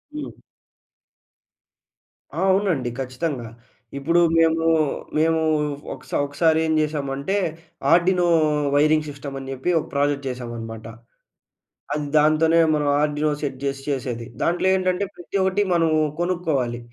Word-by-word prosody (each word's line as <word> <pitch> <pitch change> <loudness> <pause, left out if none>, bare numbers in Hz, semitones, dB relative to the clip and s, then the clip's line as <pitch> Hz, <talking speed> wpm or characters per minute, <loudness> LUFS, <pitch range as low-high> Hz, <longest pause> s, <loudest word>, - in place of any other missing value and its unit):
హ్మ్. 300 - -6 2.0
ఆ! - - -1
అవునండి 185 -10 +1
ఖచ్చితంగా. 130 -1 -3 0.5
ఇప్పుడు 165 +5 +2 0.2
మేము, 165 0 +3 0.5
మేము 160 +1 +3 0.5
ఒక - - -12
స - - -15
ఒకసారి 160 +3 +2
ఏం 160 - +1
జేసామంటే, 150 +3 -1 0.5
ఆర్డినో 180 +1 +4 0.5
వైరింగ్ 155 +1 +3
సిస్టమ్ 140 -1 -7
అని 135 0 -8
జెప్పి. 135 +6 -3
ఒక - - -6
ప్రాజెక్ట్ 140 -1 0
చేశామనమాట. 115 -3 -7 1.1
అది 150 -1 -2
దాంతోనే 155 +2 +4 0.2
మనం 150 -1 0
ఆర్డినో 150 0 0
సెట్ 140 -3 -3
జేసి 135 -1 -2
చేసేది. 125 -4 -3 0.2
దాంట్లో 175 +2 +1
ఏంటంటే, 185 +1 0
ప్రతి 175 +3 -5
ఒకటి 190 +2 +1
మనం 165 -1 +3 0.3
కొనుక్కోవాలి. 160 -9 -1
150 Hz, 115 wpm, -22 LUFS, 135-170 Hz, 2.0 s, ఆర్డినో